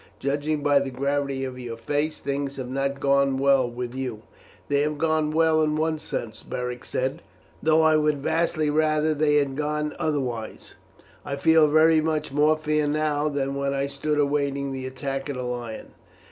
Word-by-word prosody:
Judging 145 +2 -1
by 145 -1 +4
the 140 -1 -3
gravity 140 0 -1
of 130 -1 -6
your 120 -2 -6
face, 145 +6 -2
things 140 0 -3
have 130 -2 -6
not 140 +1 -1
gone 140 -1 +2
well 135 -2 +3
with 120 0 -5
you." 125 -5 -5 0.4
"They 140 0 +2
have 150 0 -1
gone 155 0 +1
well 160 0 +3
in 150 -1 +1
one 155 0 0
sense," 110 -6 -5
Beric 125 0 -5
said, 135 +6 -2 0.4
"though 160 0 +4
I 155 -1 +5
would 150 -1 +2
vastly 155 +1 0
rather 155 0 +2
that 155 -2 -1
they 150 -1 +3
had 140 -2 +1
gone 150 +1 -2
otherwise. 125 -8 -3 0.5
I 140 - -3
feel 160 +2 +5
very 155 +1 +5
much 155 -2 -1
more 150 +2 +3
fear 150 -1 0
now 150 0 0
than 140 -1 -2
when 140 0 -1
I 135 0 0
stood 145 +2 -2
awaiting 140 -1 0
the 130 -1 -4
attack 135 +1 -4
of 140 - -3
the 125 - -4
lion." 120 -2 -5
145 Hz, 185 wpm, -25 LUFS, 135-155 Hz, 0.5 s, I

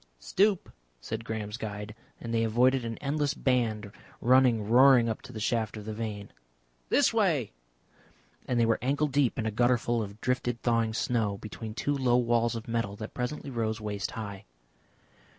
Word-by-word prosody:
"Stoop," 190 - +1 0.3
said 110 - -5
Graham's 110 -1 -4
guide, 105 -1 -6 0.3
and 115 0 -5
they 115 0 +2
avoided 125 +3 +3
an 115 -1 -4
endless 145 +1 -1
band 110 -5 0 0.3
running 125 -4 +4
roaring 125 0 +6
up 110 - -3
to - - -11
the 110 - -7
shaft 110 0 -1
of 105 - -8
the 110 - -4
vane. 105 -2 -5 0.6
"This - - +3
way!" - - +1 1.0
and 125 - +1
they 115 - +4
were 115 0 +2
ankle 140 +4 +1
deep 140 -3 +1
in 115 - -2
a 110 - 0
gutter 120 +3 +3
full 120 0 -1
of 100 0 -7
drifted 125 -1 -1
thawing 115 -2 +1
snow, 110 -5 0
between 110 +1 -8
two 145 +4 -1
low 125 -3 +3
walls 120 -1 +2
of 115 0 -6
metal 115 -3 -2
that 110 +1 -8
presently 135 +3 -4
rose 110 -2 -2
waist 105 -2 -3
high. 100 -3 -6
115 Hz, 175 wpm, -29 LUFS, 110-125 Hz, 1.0 s, roaring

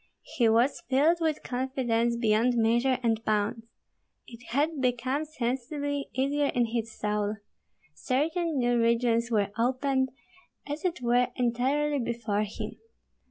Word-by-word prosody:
He 240 -6 +4
was 235 +5 +2
filled 300 +6 +3
with 315 -2 0
confidence 245 -2 0
beyond 230 +1 +2
measure 235 +3 +2
and 225 -1 +1
bounds. 215 +1 -1 0.6
It 235 +1 -13
had 290 +3 0
become 255 +4 0
sensibly 285 +1 -3
easier 280 +3 +1
in 240 -1 +3
his 230 -1 -3
soul. 210 0 -1 0.6
Certain 315 - -1
new 240 -1 +2
regions 235 0 +2
were 205 -3 +1
opened 260 +2 +1 0.6
as 295 +1 -5
it 350 -6 -1
were 245 +1 +3
entirely 270 +4 +1
before 230 -4 -1
him. 210 - -7
245 Hz, 125 wpm, -28 LUFS, 230-280 Hz, 0.6 s, He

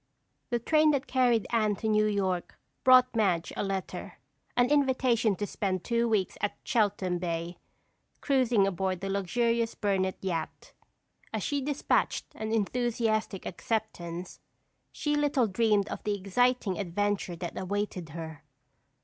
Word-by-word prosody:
The 240 - +1
train 305 +6 +3
that 275 -2 0
carried 245 -4 +2
Anne 215 -3 +2
to 220 - -4
New 215 0 +3
York 190 -4 -1 0.3
brought 255 -1 +6
Madge 185 -7 +1
a - - -2
letter—an 195 +5 -3
invitation 255 -6 +3
to 205 - -3
spend 190 -3 -2
two 235 0 +1
weeks 205 -4 0
at 205 - -1
Cheltham 200 -6 +1
Bay, 170 0 -3 0.6
cruising 250 -7 +3
aboard 185 -1 -1
the 195 0 -2
luxurious 230 +4 0
Burnett 190 -2 0
yacht. 165 -4 -4 0.6
As - - -2
she 285 -2 -1
dispatched 285 +1 0
an 220 0 -4
enthusiastic 225 -2 0
acceptance, 180 -4 -4 0.5
she 295 -1 -1
little 290 -4 +2
dreamed 210 -1 +2
of - - -6
the 210 -2 0
exciting 210 0 +1
adventure 200 0 -1
that 170 0 -6
awaited 190 -3 -3
her. 160 -1 -8
210 Hz, 130 wpm, -29 LUFS, 185-240 Hz, 0.6 s, brought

